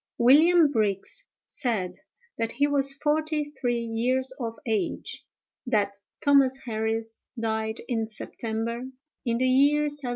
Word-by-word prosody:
"William 305 +6 +6
Brigs 205 -6 -1 0.2
said, 190 -8 -2 0.4
that 230 0 -1
he 285 +4 +2
was 280 -1 +3
forty 305 +2 0
three 250 -5 -2
years 250 +3 0
of 230 -2 -4
age; 220 -3 -2 0.4
that 205 -4 +1 0.3
Thomas 275 -2 +5
Harris 225 0 -3
died 220 0 -2
in 225 -3 -1
September, 230 +2 -4 0.4
in 235 -1 +1
the 255 - +1
year 280 +3 +4
1790. 290 -3 -3
240 Hz, 125 wpm, -26 LUFS, 225-280 Hz, 0.4 s, William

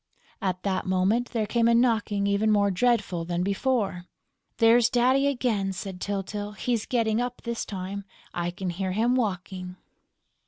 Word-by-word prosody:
At 185 -2 -2
that 195 -1 -1
moment, 190 +6 +1
there 225 -3 -1
came 230 +2 +2
a 235 - +4
knocking 220 -4 +2
even 200 +2 +2
more 200 -1 +3
dreadful 200 -4 +1
than 175 +1 -2
before. 200 -3 0 0.5
"There's 230 0 +5
Daddy 260 +3 +3
again!" 225 -8 0
said 190 -1 -7
Tyltyl. 205 +1 -3
"He's 230 +1 -2
getting 230 -2 +1
up, 245 0 -4
this 235 -1 -3
time; 195 0 -5 0.3
I 175 0 -1
can 180 0 -4
hear 185 +1 -3
him 230 +5 +2
walking...." 185 -5 -2
205 Hz, 155 wpm, -26 LUFS, 190-235 Hz, 0.5 s, There's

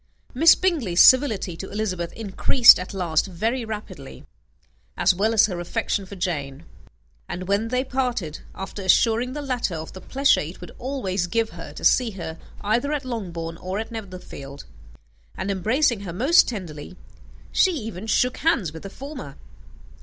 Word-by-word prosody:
Miss 315 +5 +7
Bingley's 280 - 0
civility 225 - +5
to 190 - -7
Elizabeth 185 -5 -3
increased 225 +3 +5
at 180 - -6
last 175 -3 0
very 225 +8 -2
rapidly, 220 -1 -8 0.7
as - - +4
well 205 +5 +1
as 225 -2 +5
her 180 -4 -4
affection 195 +1 -2
for 200 - -9
Jane; 150 -5 -4 0.6
and 180 0 -5
when 200 +3 +1
they 250 +2 0
parted, 250 - -2 0.2
after 195 +1 -7
assuring 230 +6 +3
the 295 0 -5
latter 250 -9 -2
of 160 0 -7
the 185 - -10
pleasure 275 +1 +2
it 160 +4 -6
would 180 - -10
always 205 -9 -2
give 225 +5 0
her - - -9
to - - -6
see 250 -2 +4
her 170 -5 -7 0.2
either 235 +8 0
at 290 -3 -3
Longbourn 170 -9 -5
or 185 +3 -4
Netherfield, 185 -10 -9 0.7
and 195 +2 -2
embracing 225 - +1
her 190 -4 -7
most 280 - +5
tenderly, 180 -6 -7 0.5
she 380 - +4
even 220 - -6
shook 250 +3 +1
hands 255 - +1
with 160 - -9
the 195 - -8
former. 265 - -9
205 Hz, 160 wpm, -23 LUFS, 180-250 Hz, 0.7 s, Miss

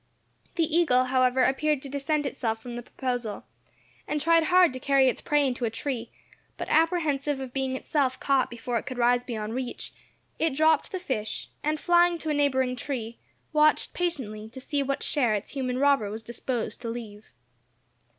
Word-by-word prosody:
The 335 - +2
eagle, 315 -6 +3
however, 255 0 +2
appeared 290 +2 +1
to - - -5
dissent 285 +2 -1
from 230 0 -3
the 240 - -4
proposal, 245 -4 -4 0.6
and 300 - -1
tried 330 +1 +4
hard 360 -4 +5
to 255 - -5
carry 270 0 +4
its 255 - 0
prey 295 -1 +2
into 250 -2 -2
a 230 - +2
tree, 235 0 -4 0.5
but - - -4
apprehensive 305 -4 +1
of 260 -2 -6
being 265 -1 -1
itself 260 -1 0
caught 275 -2 +2
before 235 0 -2
it - - -12
could 255 - -5
rise 245 0 +3
beyond 220 -3 -4
reach, 250 -1 -4 0.5
it 320 -4 +1
dropped 315 0 +3
the 375 - -2
fish, 260 - -4
and 305 +1 0
flying 345 +1 +4
to 320 - -5
a - - +2
neighbouring 260 -3 +1
tree, 240 -3 -5 0.3
watched 305 0 +3
patiently 220 -12 -3
to 255 +4 -10
see 285 +2 -1
what 275 0 -2
share 245 -8 +2
its 205 - -4
human 255 -3 -2
robber 275 -6 +3
was 220 +2 -6
disposed 235 +1 -4
to 235 - -4
leave. 220 -3 -8
265 Hz, 180 wpm, -27 LUFS, 240-295 Hz, 0.6 s, hard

